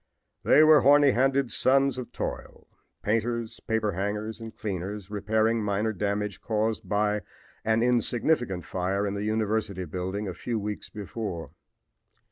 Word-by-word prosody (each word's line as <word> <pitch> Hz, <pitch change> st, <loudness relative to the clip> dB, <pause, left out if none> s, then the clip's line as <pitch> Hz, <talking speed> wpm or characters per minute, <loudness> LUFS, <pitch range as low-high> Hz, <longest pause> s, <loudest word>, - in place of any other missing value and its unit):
They 155 Hz, -, +6 dB
were 155 Hz, -2 st, +7 dB
horny 145 Hz, +1 st, +6 dB
handed 135 Hz, +1 st, +2 dB
sons 135 Hz, 0 st, +3 dB
of 125 Hz, -, -7 dB
toil -, -, -6 dB, 0.4 s
painters, 115 Hz, +1 st, -1 dB
paper 110 Hz, -2 st, -1 dB
hangers 105 Hz, +4 st, -3 dB
and 115 Hz, -1 st, -9 dB
cleaners 100 Hz, 0 st, -5 dB
repairing 110 Hz, +2 st, +1 dB
minor 105 Hz, +2 st, 0 dB
damage 105 Hz, 0 st, -2 dB
caused 110 Hz, -1 st, -1 dB
by 105 Hz, 0 st, +1 dB, 0.4 s
an 110 Hz, +1 st, +2 dB
insignificant 120 Hz, -, +1 dB
fire 95 Hz, +2 st, -1 dB
in 100 Hz, -, -2 dB
the 100 Hz, 0 st, -3 dB
university 110 Hz, -3 st, -1 dB
building 95 Hz, +5 st, -4 dB
a 95 Hz, -, -3 dB
few 115 Hz, +7 st, -3 dB
weeks 105 Hz, 0 st, -4 dB
before. 105 Hz, -4 st, -5 dB
110 Hz, 135 wpm, -27 LUFS, 100-115 Hz, 0.4 s, were